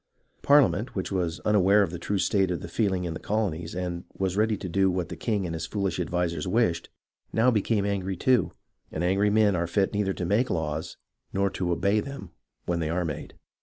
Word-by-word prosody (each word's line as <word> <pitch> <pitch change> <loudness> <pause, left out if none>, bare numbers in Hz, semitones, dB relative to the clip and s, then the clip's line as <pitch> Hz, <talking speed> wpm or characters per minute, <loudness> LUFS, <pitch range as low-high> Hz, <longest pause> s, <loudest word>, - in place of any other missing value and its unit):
Par 145 +1 +7
liament, 100 +4 -1
which 95 0 -3
was 90 -3 -1
unaware 105 0 +4
of 90 - -2
the 85 - -6
true 100 +3 -1
state 95 -1 +2
of 90 -2 -2
the - - -6
feel 100 +4 0
ing 90 -1 -1
in 85 - -3
the - - -6
colonies, 90 -6 -2
and 90 -1 -3
was 95 -1 -1
ready 110 +1 +2
to 95 - -6
do 95 +2 +2
what 90 -1 -2
the - - -5
king 105 -5 -1
and 85 - -3
his 80 - -4
foolish 100 -4 -2
advisers 85 -3 -1
wished, 90 -5 +1 0.4
now 115 +3 +3
became 105 -2 +1
angry 95 -2 -2
too; 125 +5 +2 0.4
and 80 - -3
angry 100 +3 +2
men 105 -2 +3
are 85 0 0
fit 95 +3 +1
neither 100 -2 0
to 90 - -4
make 105 +8 +2
laws 80 -2 -3 0.4
nor 100 0 +1
to 90 -2 -2
obey 100 +5 +2
them 105 -7 -7 0.3
when 85 -1 -1
they 80 -2 -1
are 90 +2 0
made. 75 -3 -6
95 Hz, 220 wpm, -27 LUFS, 85-105 Hz, 0.4 s, Par